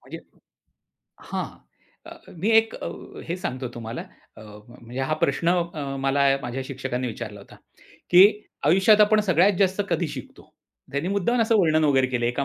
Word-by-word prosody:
म्हणजे - - -10 1.0
हां. - - -5 0.6
अ, - - -10 0.2
मी 195 +7 -2
एक 225 0 +3
अ, - - -5 0.4
हे 170 - -2
सांगतो 130 -9 -4
तुम्हाला 115 0 -6 0.3
अ, - - -12 0.3
म्हणजे 120 +2 -8
हा 135 +4 0
प्रश्न 165 +4 +1 0.3
अ, 140 -2 -4
मला 140 +1 +2 0.2
माझ्या 125 +2 -4
शिक्षकांनी 130 -1 -4
विचारला 110 -3 -7
होता, 100 - -16 0.5
की 180 +1 +8 0.4
आयुष्यात 195 +6 +5
आपण 210 +1 +5
सगळ्यात 185 0 +3
जास्त 195 +1 +2
कधी 170 -1 0
शिकतो. - - -11 0.4
त्यांनी 140 +6 -2
मुद्दाम 200 +5 0
असं 225 0 +2
वर्णन 155 -2 +2
वगैरे 135 -3 +3
केलं. 125 -2 -2
एका 125 +3 -1
145 Hz, 160 wpm, -24 LUFS, 130-190 Hz, 1.0 s, की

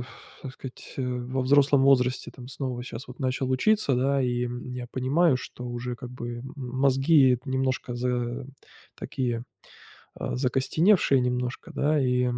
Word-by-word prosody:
ф 120 - -7 0.4
так 130 - -6
сказать, 130 -2 -10
э, 135 - -2
во 125 +1 -2
взрослом 140 +1 +4
возрасте 130 -2 +3
там 125 -1 -10
снова 130 -3 -4
щас 120 0 -7
вот 125 - -11
начал 130 -1 -1
учиться, 145 +2 +2
да, 135 +2 +2
и, 125 -1 0
м, 120 +1 -6
я 125 -1 -5
понимаю, 140 +4 +2
что 125 -1 -8
уже 120 0 -4
как 120 +1 -8
бы, 120 -1 -6
м, 135 +4 -9
мозги 135 +1 +3
немножко 130 -2 -1
за 125 +1 -2 0.5
такие, 120 -3 -2 0.7
а, - - -3
закостеневшие 135 +4 +3
немножко, 125 +6 -2
да. 145 +1 +2
И, 125 -1 +2
130 Hz, 155 wpm, -26 LUFS, 125-135 Hz, 0.7 s, взрослом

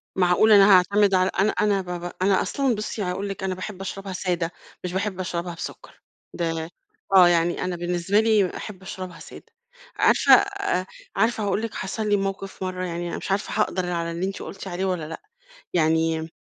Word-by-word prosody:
معقولة 190 +4 +5
أنا 200 0 +7
هاعتمد 200 +2 +3
على 185 0 +3
أنا 210 +2 +4
أنا 205 -2 +1
ب 185 - -12 0.2
ب 175 - -4
أنا 190 0 +3
أصلًا 270 -4 0
بُصّي 215 +1 -4
هاقول 195 +3 -3
لِك 195 -1 -6
أنا 190 -1 -1
باحب 190 +1 -7
أشربها 195 0 -5
سادة، 180 -2 -1 0.3
مش 180 -1 -4
باحب 190 0 -2
أشربها 175 -1 -3
بسكر، - - -9 0.3
ده 165 -1 -2 0.5
آه 180 -2 +9
يعني 175 0 +2
أنا 180 -1 -2
بالنسبة 175 +3 0
لي 215 -4 +2
أحب 195 -3 -8
أشربها 185 -1 -7
سادة، - - -12 0.5
عارفة - - +5
أ 400 - 0 0.3
عارفة 220 +2 +1
هاقول 200 +1 0
لِك 225 -1 -4
حصل 210 +3 -3
لي 205 - +4
موقف 195 0 -4
مَرّة 185 0 -3
يعني 175 0 -4
أنا - - -4
مش - - -5
عارفة 205 +2 0
هاقدر 185 -3 -1
على 170 -1 -2
اللي 170 +2 -2
أنتِ 195 - -5
قلتِ 195 0 -8
عليه 185 +1 -2
والّا 180 -5 -2
لأ، 165 - -8 0.5
يعني 160 -1 +1
185 Hz, 190 wpm, -24 LUFS, 175-200 Hz, 0.5 s, آه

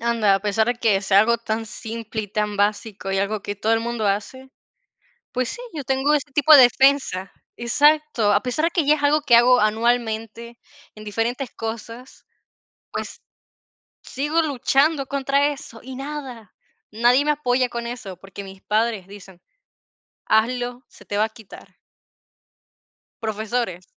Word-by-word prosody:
Anda, 230 -4 +2
a 195 - 0
pesar 210 +2 +1
de 245 - +1
que 220 -5 +1
sea 195 0 +4
algo 235 +2 +2
tan 225 -1 -3
simple 225 0 -6
y 205 - -8
tan 210 +1 -2
básico, 205 -1 -1
y 195 - 0
algo 200 +1 -2
que 205 - -4
todo 215 +3 0
el 225 - +3
mundo 230 -2 -2
hace, 235 +7 -3 0.8
pues 250 -1 -1
sí, 485 - -7
yo 300 - -4
tengo 265 +2 +1
ese 290 0 -2
tipo 295 +2 +6
de 275 - +10
defensa. 255 -7 +2 0.2
Exacto. 290 -2 +2
A 205 - +2
pesar 260 +6 -1
de - - 0
que 335 -2 0
ya 300 +2 +4
es 290 - -8
algo 295 +1 +3
que 245 - +4
hago 250 +1 +5
anualmente 225 +1 -1 0.4
en 215 - -11
diferentes 230 +4 -2
cosas, 230 +3 -8 0.7
pues, - - -6 0.8
sigo 295 +5 -1
luchando 280 0 +1
contra 280 +1 +1
eso 235 -5 -10
y 260 0 -8
nada. 270 -7 -8 0.4
Nadie 240 +6 +3
me 300 - +3
apoya 255 -3 +1
con 235 0 -5
eso, 225 -6 -7
porque 195 +2 -10
mis 190 0 -12
padres 215 -2 0
dicen: 195 -3 -14 0.8
"Hazlo, 245 +3 0
se - - -18
te 205 - -3
va 210 - +3
a - - -6
quitar". 220 -2 -15 1.5
Profesores, 220 -3 -3
235 Hz, 160 wpm, -22 LUFS, 215-265 Hz, 1.5 s, de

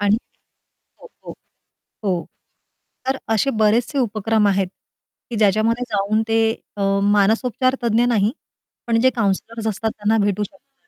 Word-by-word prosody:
आणि 205 +1 +3 0.9
हो, - - -12 0.2
हो. - - -8 0.7
हो. 180 -4 0 0.8
तर 265 - +1 0.2
असे 220 +6 +2
बरेचसे 230 +6 +2
उपक्रम 220 -2 +1
आहेत 195 -1 +1 0.6
की 235 - -3
ज्याच्यामध्ये 220 +3 +2
जाऊन 210 +1 +1
ते 225 0 +2 0.4
अ, 200 - -2 0.2
मानसोपचार 220 +5 +2
तज्ञ 235 0 +2
नाही, 220 -3 +2 0.5
पण 230 -1 +2
जे 260 +2 +5
काउंसलर्स 225 +1 -1
असतात 220 +1 -1
त्यांना 215 +2 +2
भेटू 205 0 0
शकतात. 275 - -18
220 Hz, 130 wpm, -21 LUFS, 205-235 Hz, 0.9 s, जे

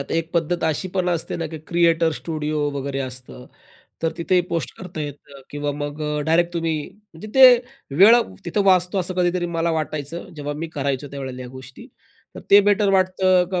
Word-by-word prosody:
आता 140 - -4
एक 165 0 -1
पद्धत 170 +1 0
अशी 160 +4 -1
पण 185 -2 0
असते 170 -2 -2
ना 165 - -3
की 160 0 -8
क्रिएटर 170 -1 +2
स्टुडिओ 155 -2 -2
वगैरे 135 0 -4
असतं. 130 -1 -8 0.6
तर 165 - 0
तिथे 180 +2 +2
पोस्ट 165 -2 -2
करता 180 -4 -7
येतं 145 -1 -8
किंवा 145 0 -3
मग 145 +1 -5
अ, 150 0 -2
डायरेक्ट 170 +2 +2
तुम्ही 165 -2 -1 0.2
म्हणजे 210 -2 -13
ते 265 -1 +10 0.5
वेळ 205 +7 +8 0.3
तिथं 200 +4 0
वाचतो 185 0 +3
असं 185 0 -2
कधीतरी 175 0 +1
मला 165 +1 +1
वाटायचं 155 +2 -4
जेव्हा 145 0 -4
मी 165 +2 -4
करायचो 140 0 -2
त्यावेळेला 135 -2 -6
ह्या 125 - -8
गोष्टी. 130 - -12 0.5
तर - - -8
ते 200 - +9
बेटर 205 0 +2
वाटतं 185 -1 +3
का 180 - 0
165 Hz, 185 wpm, -22 LUFS, 145-180 Hz, 0.6 s, ते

